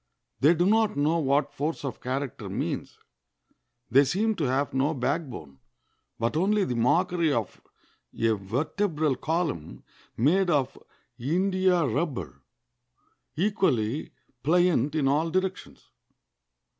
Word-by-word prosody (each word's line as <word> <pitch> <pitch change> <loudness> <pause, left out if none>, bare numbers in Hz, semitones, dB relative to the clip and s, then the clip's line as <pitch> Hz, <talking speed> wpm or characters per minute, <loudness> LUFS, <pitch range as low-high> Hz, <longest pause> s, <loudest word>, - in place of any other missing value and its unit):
They 155 +5 +5
do 175 +2 +2
not 220 -3 +2
know 155 +4 +2
what 140 0 +1
force 150 +1 -3
of 135 - -5
character 130 0 -4
means. - - -4 0.9
They 135 +4 +6
seem 205 +11 +1
to 155 - 0
have 135 +2 0
no 140 +4 +1
backbone, 125 - -3 0.6
but 115 +5 -1
only 195 +4 +2
the 125 - -2
mockery 170 +7 +2
of 115 -7 -3 0.6
a 115 - +3
vertebral 150 - -1
column 155 - -3 0.3
made 175 - +3
of 145 -6 +1 0.4
india 180 +4 +2
rubber, 115 - -3 0.9
equally 155 - 0 0.3
pliant 160 -3 +2
in 145 -3 +1
all 150 +4 +2
directions. 185 +2 -3
150 Hz, 115 wpm, -27 LUFS, 130-175 Hz, 0.9 s, They